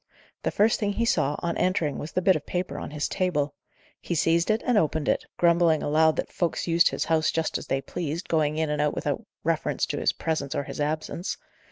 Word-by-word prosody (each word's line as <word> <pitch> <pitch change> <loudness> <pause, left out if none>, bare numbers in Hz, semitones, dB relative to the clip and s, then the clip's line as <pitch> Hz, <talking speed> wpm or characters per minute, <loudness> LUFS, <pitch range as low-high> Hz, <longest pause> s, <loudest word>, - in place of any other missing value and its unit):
The - - 0
first 215 +2 +2
thing 205 -2 0
he 230 - 0
saw, 150 -9 +2
on 170 -1 -1
entering, 170 -6 0
was 155 - -6
the 185 - 0
bit 190 0 +5
of 150 - -3
paper 180 0 -3
on - - -6
his 150 0 -2
table. 150 -7 0 0.5
He 170 - -3
seized 165 +3 +2
and 225 +3 +1
opened 160 -5 +1
it, - - +1
grumbling 170 -2 +3
aloud 155 +1 +3
that - - -3
folks 175 -2 -1
used 170 0 +4
his - - -2
house 160 -1 +2
just 160 -1 -1
as - - -10
they 135 - 0
pleased, 165 +2 -4
going 155 -2 +1
in 160 -1 0
and 150 0 0
out 150 0 +1
without - - -2 0.2
reference - - 0
to - - -3
his - - +2
presence 155 -2 -2
or 145 - 0
his 150 - -6
absence. 155 +4 -2
160 Hz, 220 wpm, -26 LUFS, 150-175 Hz, 0.5 s, bit